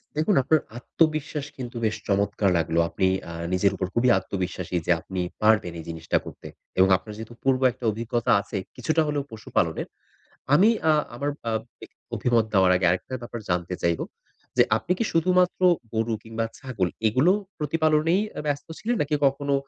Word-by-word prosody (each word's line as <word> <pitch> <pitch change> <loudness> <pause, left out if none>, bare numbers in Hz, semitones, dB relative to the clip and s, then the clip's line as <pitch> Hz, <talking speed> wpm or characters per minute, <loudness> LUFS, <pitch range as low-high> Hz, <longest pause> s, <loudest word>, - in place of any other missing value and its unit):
দেখুন 160 +6 +2
আপনার 155 +4 +3 0.2
আত্মবিশ্বাস 155 +2 0
কিন্তু 125 -1 -7
বেশ 110 - 0
চমৎকার 100 0 +1
লাগলো! 85 0 0
আপনি 95 - +1 0.2
আ - - -7 0.2
নিজের 95 +2 +3
উপর 95 - -2
খুবই 120 +2 +3
আত্মবিশ্বাসী 90 -2 -3
যে, - - +2
আপনি 95 -1 -4 0.2
পারবেন 105 -5 +3
এই - - -7
জিনিসটা 80 0 -1
করতে। - - -10 0.3
এবং 95 +1 +6
আপনার 105 +3 -10
যেহেতু 110 +1 -8
পূর্ব 135 -1 +2
একটা 120 0 -9
অভিজ্ঞতা 115 +2 -1
আছেই, 100 -2 -5
কিছুটা 155 +6 +1
হলেও 145 -1 -1
পশু-পালনের, 110 -1 -1 0.7
আমি 190 +8 +6 0.2
আ - - +6 0.2
আমার 140 +4 -2 0.2
আ - - +1 0.3
এ - - -11 0.3
অভিমত 115 0 +2
নেওয়ার 95 -2 +5
আগে 90 -1 +1
আরেকটা 95 +8 -2
ব্যাপার 120 0 -6
জানতে 90 +1 -1
চাইবো 85 -1 +1 0.5
যে, - - +7
আপনি 110 +11 -1
কি - - +1
শুধুমাত্র 180 +2 +2 0.3
গরু 110 +1 0
কিংবা 115 0 -3
ছাগল 105 -9 -2 0.2
এগুলো 130 - +4 0.3
প্রতিপালনেই 155 +3 +2
অ্যা - - -6
ব্যস্ত 145 -1 -2
ছিলেন? 235 +3 -1
নাকি 150 +1 -1
কখনো 140 +1 0
115 Hz, 170 wpm, -25 LUFS, 95-150 Hz, 0.7 s, যে